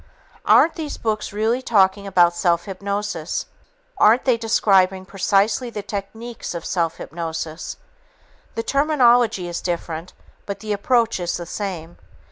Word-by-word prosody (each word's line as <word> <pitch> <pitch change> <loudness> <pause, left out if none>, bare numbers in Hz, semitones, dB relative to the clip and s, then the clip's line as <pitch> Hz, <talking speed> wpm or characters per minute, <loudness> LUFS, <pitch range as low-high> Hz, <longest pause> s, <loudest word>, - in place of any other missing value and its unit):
Aren't 330 - +6
these 310 -3 -5
books 215 -1 -2
really 220 +5 0
talking 200 -4 +2
about 175 -3 +4
self 170 -1 +1
hypnosis? 200 -3 -3 0.5
Aren't 225 +4 +5
they 255 -3 +4
describing 195 -4 +2
precisely 200 +5 +1
the 210 -3 -6
techniques 220 +2 -6
of 170 - -5
self 165 -2 -1
hypnosis? 160 -1 -5 0.8
The 230 - -2
terminology 245 - +3
is 175 0 -4
different, 170 -1 -4 0.3
but 200 - -4
the 215 -1 -3
approach 230 +1 +1
is 175 -1 -2
the 175 - -6
same. 175 -3 -6
200 Hz, 130 wpm, -21 LUFS, 175-230 Hz, 0.8 s, Aren't